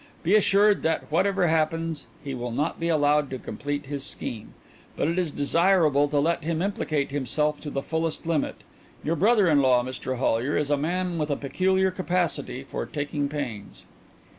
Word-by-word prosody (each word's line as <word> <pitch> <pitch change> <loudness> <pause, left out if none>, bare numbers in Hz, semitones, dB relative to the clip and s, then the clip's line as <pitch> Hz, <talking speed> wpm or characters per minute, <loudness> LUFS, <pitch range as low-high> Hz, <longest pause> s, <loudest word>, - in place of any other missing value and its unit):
Be 175 - +2
assured 205 0 +4
that 160 -1 -1
whatever 190 +3 +2
happens 165 0 0 0.2
he 140 - -4
will 120 -1 -4
not 145 +7 -2
be 170 - -1
allowed 150 -2 +2
to 130 - -4
complete 145 +3 -4
his 140 0 -5
scheme; 115 -5 -6 0.4
but - - +1
it 170 +3 0
is 175 -3 0
desirable 150 -1 +3
to 145 0 -1
let 160 +3 +1
him 160 0 -1
implicate 155 -7 -1
himself 145 +2 0
to 150 - -5
the 135 -1 -3
fullest 160 0 -2
limit. 160 -3 0 0.5
Your 160 +3 0
brother 205 +3 +4
in 150 -3 +4
law, 125 -2 +4
Mr 130 0 -4
Hollyer, 125 +2 +1
is 150 0 -1
a - - +5
man 175 +4 -1
with 150 0 -1
a 145 - +1
peculiar 190 +7 +1
capacity 175 -8 -2
for - - -5
taking 145 -1 -2
pains." 125 -9 -6
150 Hz, 180 wpm, -26 LUFS, 140-170 Hz, 0.5 s, a